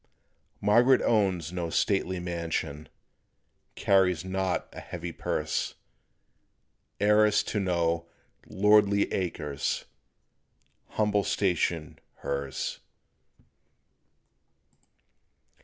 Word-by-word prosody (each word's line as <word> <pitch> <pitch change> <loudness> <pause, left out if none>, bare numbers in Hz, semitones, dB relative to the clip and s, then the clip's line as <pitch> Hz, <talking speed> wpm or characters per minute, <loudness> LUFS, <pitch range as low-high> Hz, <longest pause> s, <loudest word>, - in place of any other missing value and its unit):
Margaret 120 +6 +5
owns 95 -7 +1
no 85 -2 -3
stately 95 +1 0
mansion, 85 -4 -4 0.9
Carries 95 -3 +2
not 95 -1 -1
a - - -8
heavy 85 -1 -6
purse; - - -2 1.2
Heiress 105 +1 +4
to 105 - -2
no 85 -3 0 0.4
"lordly 105 0 +3
acres," 75 -6 -2 1.0
Humble 105 -1 +1
station 90 -5 -1 0.2
hers. 70 -1 -3
95 Hz, 70 wpm, -28 LUFS, 85-100 Hz, 1.2 s, Margaret